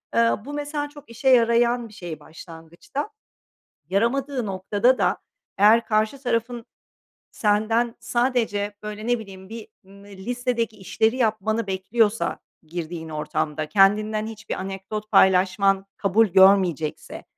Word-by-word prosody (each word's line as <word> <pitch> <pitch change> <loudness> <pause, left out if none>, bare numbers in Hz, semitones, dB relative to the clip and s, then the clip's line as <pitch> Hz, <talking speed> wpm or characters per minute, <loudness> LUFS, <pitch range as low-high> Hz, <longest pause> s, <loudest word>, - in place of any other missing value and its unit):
Eee, 230 0 +4
bu 290 - -7
mesela 290 0 -3
çok 290 -2 -15
işe 235 +3 0
yarayan 235 -1 +3
bir 215 - -17
şey 170 -5 -7
başlangıçta. 165 - -8 0.8
Yaramadığı 250 +6 0
noktada 200 +6 +1
da - - +1 0.4
eğer 220 +4 +5
karşı 215 +5 0
tarafın 235 -1 -2 0.7
senden 225 +3 +1
sadece, 235 -4 -1
böyle, 210 +1 -6
ne 245 -1 +1
bileyim, 190 -2 -11
bir 225 -1 -8 0.2
ımm, 200 +1 -16
listedeki 230 +3 -3
işleri 220 +4 0
yapmanı 220 -1 0
bekliyorsa, 210 +3 0 0.2
girdiğin 165 0 -6
ortamda 155 0 -3
kendinden 210 +4 +3
hiçbir 220 0 -6
anekdot 195 +3 -6
paylaşman 190 +1 +4
kabul 210 +3 +3
görmeyecekse, 190 -5 +3
215 Hz, 115 wpm, -23 LUFS, 190-235 Hz, 0.8 s, eğer